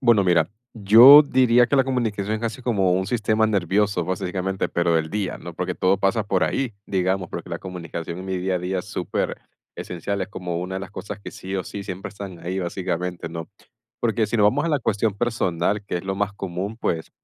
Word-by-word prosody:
Bueno, 120 -6 +4
mira, 85 -3 +3 0.3
yo 115 +8 +9
diría 125 -3 +4
que 140 +3 +1
la 135 - +4
comunicación 110 -5 -1
es 110 - -3
casi 115 +2 -4
como 100 -7 +2
un 95 +1 0
sistema 110 -1 +1
nervioso, 100 -2 +1
básicamente, 95 +1 -2
pero 85 -1 +1
del 80 -1 0
día, 100 -3 -2
¿no? - - -9
Porque - - -3
todo 95 +1 +2
pasa 100 +3 +1
por 95 -3 +1
ahí, 130 -5 -1
digamos, 95 -1 0
porque - - -6
la - - -3
comunicación 85 -2 -6
en 95 - -7
mi 95 -1 -2
día 90 0 -1
a - - -1
día 90 +1 -2
es - - -13
superesencial, 95 +3 -5
es 95 - -3
como 90 -3 -4
una 95 +1 -4
de - - -3
las 100 - -8
cosas 105 0 -7
que - - -8
sí 95 +1 -7
o 95 - -3
sí 100 - -6
siempre 95 -1 -6
están 100 -3 -8
ahí 95 +3 -3
básicamente, 90 -1 -3
¿no? 80 -1 -7 0.5
Porque 115 -2 +1
si 115 - -1
nos 105 - +4
vamos 135 +8 +3
a - - 0
la 150 -3 +2
cuestión 105 -2 0
personal, 105 -4 0
que 100 - -3
es 85 - -9
lo 95 0 -2
más 100 0 -1
común, 95 +2 -4
pues, 80 -8 -2
95 Hz, 220 wpm, -23 LUFS, 90-110 Hz, 0.5 s, yo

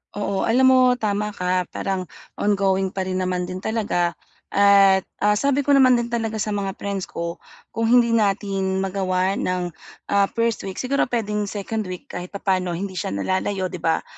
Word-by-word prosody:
Oo. 200 -1 -1
Alam 250 +3 +3
mo - - +5 0.2
tama 210 -1 -1
ka, 180 -1 0
parang 190 -1 -2 0.3
on 205 - +1
going 195 -1 +1
pa 190 -1 -3
rin 185 - -2
naman 180 -1 -1
din 185 +1 -6
talaga 205 -6 0 0.4
at, 195 -1 +5 0.2
ah, 210 0 +3
sabi 280 +1 +1
ko 285 - +1
naman 260 -3 +6
din 235 0 -2
talaga 225 -2 -2
sa 215 0 -2
mga 195 -2 -2
friends 200 -2 -4
ko, 170 0 -5 0.3
"Kung 225 0 -1
hindi 235 0 +4
natin 195 -3 0
magawa 190 0 0
ng, 180 -1 -2 0.4
ah, 200 0 +4
first 230 -3 0
week, 190 - -6
siguro 270 +1 0
puwedeng 210 -4 -1
second 210 +1 -4
week." 180 -1 -8
Kahit 180 0 -5
papaano 185 -3 0
hindi 195 +3 -4
siya 100 - -3
nalalayo, 185 - -1
'di 180 - -6
ba? 165 0 0
200 Hz, 180 wpm, -22 LUFS, 185-220 Hz, 0.4 s, naman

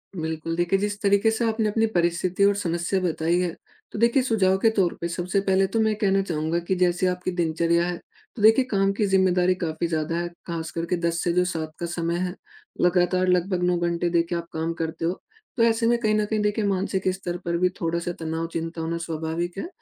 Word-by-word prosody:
बिल्कुल, 160 0 -3
देखिए 175 +3 +1
जिस 205 0 -2
तरीके 200 +2 +3
से 225 +1 0
आपने 220 -1 +1
अपनी 225 +2 +2
परिस्थिति 175 +2 +1
और 200 0 +4
समस्या 175 0 -1
बताई 170 -1 0
है। 180 -2 -1 0.4
तो - - -5
देखिए 235 +3 +3
सुझाव 195 -6 +2
के 225 +4 +3
तौर 195 -6 +1
पे 170 - -1
सबसे 180 +3 -1
पहले 195 0 +2
तो 225 +4 -1
मैं 220 -1 +2
कहना 195 -2 +2
चाहूँगा 165 -2 -1
कि 175 +2 -1
जैसे 180 0 +2
आपकी 180 0 -2
दिनचर्या 170 0 +1
है। 175 - -3 0.4
तो 230 - -6
देखिए 225 +5 +6
काम 195 -1 +2
की 205 +1 0
ज़िम्मेदारी 185 -2 +3
काफ़ी 160 +1 -1
ज़्यादा 160 0 -1
है। 175 0 -1 0.2
ख़ास 165 -2 -4
करके 170 +1 -2
10 170 0 -1
से 175 - +1
जो 180 +1 +3
7 160 -3 -3
का 170 - -2
समय 170 0 -2
है 180 0 -2 0.5
लगातार, 180 +1 +2
लगभग 180 0 +1
9 180 0 +2
घंटे 170 0 0
देखिए 170 0 +1
आप 170 - -6
काम 160 +1 -2
करते 160 0 -3
हो। 175 +3 -1 0.4
तो 230 - +4
ऐसे 230 0 +3
में 240 - +3
कहीं 215 -2 +1
न 210 0 +1
कहीं 215 +1 -1
देखिए 210 +1 0
मानसिक 190 -1 -1
स्तर 180 -2 -4
पर 170 0 0
भी 180 +1 +2
थोड़ा-सा 170 +1 -1
तनाव, 160 0 -3
चिंता 165 0 -4
होना 165 +1 -2
स्वाभाविक 165 +2 -3
है। 195 - -4
180 Hz, 220 wpm, -24 LUFS, 170-195 Hz, 0.5 s, देखिए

